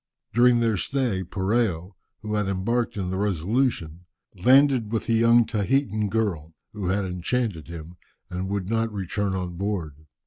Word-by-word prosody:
During 120 Hz, +1 st, +5 dB
their 115 Hz, -3 st, +2 dB
stay, 120 Hz, -6 st, -1 dB
Poreo, 95 Hz, -1 st, -1 dB, 0.3 s
who 105 Hz, 0 st, -3 dB
had 105 Hz, -2 st, 0 dB
embarked 105 Hz, +5 st, -1 dB
in 90 Hz, -2 st, -2 dB
the 95 Hz, -, -2 dB
Resolution, 95 Hz, -, -1 dB, 0.3 s
landed 130 Hz, +2 st, +4 dB
with 115 Hz, -, -2 dB
a -, -, +3 dB
young 115 Hz, +1 st, +5 dB
Tahitan 110 Hz, -1 st, 0 dB
girl, 90 Hz, -8 st, -2 dB, 0.2 s
who 100 Hz, -4 st, -4 dB
had 95 Hz, +2 st, 0 dB
enchanted 90 Hz, 0 st, -2 dB
him, 85 Hz, +1 st, -9 dB, 0.3 s
and 90 Hz, +1 st, -4 dB
would 100 Hz, -2 st, -2 dB
not 115 Hz, +1 st, 0 dB
return 100 Hz, 0 st, -2 dB
on 90 Hz, -2 st, -4 dB
board. 80 Hz, -7 st, -4 dB
100 Hz, 150 wpm, -25 LUFS, 90-115 Hz, 0.3 s, During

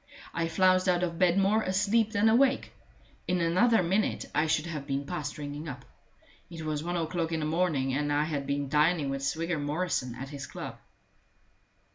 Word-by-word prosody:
I 165 Hz, 0 st, -1 dB
flounced 185 Hz, +2 st, +3 dB
out 180 Hz, 0 st, +2 dB
of 170 Hz, -2 st, -2 dB
bed 180 Hz, 0 st, +4 dB
more 200 Hz, +3 st, +3 dB
asleep 205 Hz, +3 st, +1 dB
than 215 Hz, 0 st, +2 dB
awake; 260 Hz, +4 st, +3 dB, 0.5 s
in 180 Hz, 0 st, +1 dB
another 185 Hz, +6 st, +3 dB
minute 190 Hz, +5 st, 0 dB
I 155 Hz, +1 st, +2 dB
should 155 Hz, 0 st, +1 dB
have 150 Hz, -5 st, -5 dB
been 140 Hz, +1 st, -2 dB
past 145 Hz, 0 st, -4 dB
ringing 145 Hz, +1 st, -6 dB
up. 135 Hz, -, -8 dB, 0.6 s
It 165 Hz, -2 st, -8 dB
was 155 Hz, -1 st, -2 dB
one 175 Hz, +1 st, -2 dB
o'clock 165 Hz, 0 st, -2 dB
in 160 Hz, -1 st, -1 dB
the -, -, -1 dB
morning, 155 Hz, -5 st, 0 dB
and 145 Hz, +1 st, 0 dB
I 145 Hz, +1 st, +2 dB
had 145 Hz, -3 st, -3 dB
been 140 Hz, 0 st, -1 dB
dining 150 Hz, 0 st, +2 dB
with 135 Hz, 0 st, -3 dB
Swigger 165 Hz, +3 st, -1 dB
Morrison 145 Hz, -4 st, -2 dB
at 135 Hz, +2 st, -7 dB
his 140 Hz, -2 st, -7 dB
club. -, -, -8 dB
165 Hz, 185 wpm, -29 LUFS, 145-185 Hz, 0.6 s, bed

